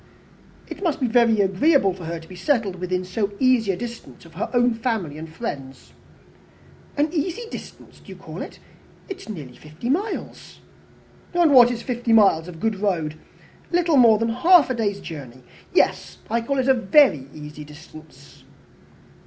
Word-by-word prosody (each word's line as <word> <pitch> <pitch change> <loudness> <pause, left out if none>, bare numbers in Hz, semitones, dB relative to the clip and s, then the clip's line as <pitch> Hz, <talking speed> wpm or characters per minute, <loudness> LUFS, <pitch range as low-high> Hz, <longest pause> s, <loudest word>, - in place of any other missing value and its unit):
"It - - -9
must 335 -5 -1
be 260 - 0
very 230 -2 +3
agreeable 195 - +3
to 180 -2 -10
her 165 +1 -4
to 165 - -15
be 185 - -11
settled 205 -2 0
within 180 0 -3
so 200 +2 -2
easy 255 -6 +3
a 180 - -4
distance 230 - -9
of 165 - -16
her 190 +8 -4
own 245 -1 +3
family 225 - -3
and 160 +1 -8
friends." 145 - -7 1.0
"An 300 +3 +1
easy 350 +7 -2
distance - - -11
do - - -22
you - - -9
call - - -9
it? - - -8 0.5
It 385 -1 -6
is - - -13
nearly 145 -11 -8
fifty 155 - -6
miles." 400 +8 -4 0.7
"And 340 -4 +4
what 245 -2 +8
is 235 -1 -4
fifty 240 -2 -1
miles 195 -7 +4
of 170 -2 -10
good 215 0 -1
road? 175 -7 -1 0.6
Little 340 -3 +2
more 230 -4 +6
than 230 +1 -1
half 295 +4 +5
a - - +1
day's 205 -4 -2
journey. 130 -6 -9 0.3
Yes, - - +1
I 235 +1 +1
call 275 +4 -2
it 260 -1 0
a 265 - +6
very 235 - +3
easy 150 0 -9
distance." 150 -2 -15
220 Hz, 175 wpm, -22 LUFS, 165-255 Hz, 1.0 s, what